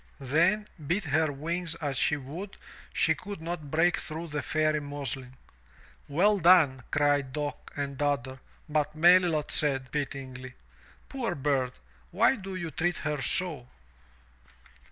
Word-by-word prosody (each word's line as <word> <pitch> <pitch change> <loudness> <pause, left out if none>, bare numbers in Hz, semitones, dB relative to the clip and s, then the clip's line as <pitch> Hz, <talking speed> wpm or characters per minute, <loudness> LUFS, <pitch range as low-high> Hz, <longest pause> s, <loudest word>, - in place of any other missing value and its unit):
Then, 170 +10 +2 0.2
beat 185 +6 0
her 155 -1 +1
wings 165 +4 -3
as 145 -4 -3
she 150 - +2
would, 160 +9 -8 0.3
she 160 - +3
could 200 +4 -8
not 160 -2 -5
break 165 +4 +3
through 165 +1 -6
the 150 -1 -2
Fairy 155 -1 +1
muslin. 135 -3 -5 0.7
"Well 195 +8 +3
done," 160 -7 +5
cried 145 -2 +2
Dock 145 -1 -4
and 140 -1 -4
Dodder, 135 -3 -1 0.3
but 150 -1 -1
Melilot 170 -2 +4
said, 135 -4 0
pityingly, 130 -3 -5 0.5
"Poor 240 -9 -3
bird! 135 -3 0 0.4
Why 265 - +3
do 195 -3 -7
you 170 -3 -4
treat 175 +4 0
her 150 -3 -2
so?" 155 -2 +2
150 Hz, 135 wpm, -28 LUFS, 140-175 Hz, 0.7 s, done